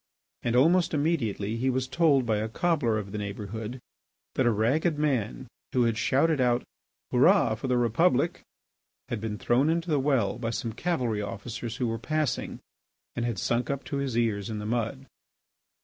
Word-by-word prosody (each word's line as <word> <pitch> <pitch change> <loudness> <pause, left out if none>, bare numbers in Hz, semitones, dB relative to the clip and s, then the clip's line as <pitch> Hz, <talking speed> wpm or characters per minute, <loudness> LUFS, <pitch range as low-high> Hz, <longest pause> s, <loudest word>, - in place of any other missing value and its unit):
And 120 - 0
almost 165 +6 +4
immediately 115 -9 0
he 130 +3 +1
was 130 0 0
told 145 -4 +3
by 110 -2 +1
a 110 +1 -2
cobbler 140 -5 +1
of 100 -2 -5
the 105 - -4
neighbourhood 105 +4 -5 0.5
that 130 - +2
a - - +5
ragged 140 - +1
man 130 - -1 0.3
who 125 - +3
had 115 -1 +1
shouted 140 +5 +2
out 125 -1 +2 0.5
"Hurrah - - +5
for - - -4
the 125 -1 +2
Republic!" 130 +6 +2 0.7
had 115 -3 -3
been 110 -2 -3
thrown 130 +8 +2
into 170 +1 0
the 145 - +3
well 130 -6 +1
by 115 -2 -2
some 115 0 -3
cavalry 125 -8 -1
officers 115 +3 -5
who 125 - -1
were 115 -1 -2
passing, 155 +1 -2 0.6
and 120 - -1
had 120 -4 -2
sunk 120 +6 0
up 140 -1 -2
to 140 - -4
his 135 -4 -2
ears 110 -3 0
in 110 - -3
the 105 - -5
mud. 120 +4 -2
120 Hz, 180 wpm, -27 LUFS, 110-140 Hz, 0.7 s, a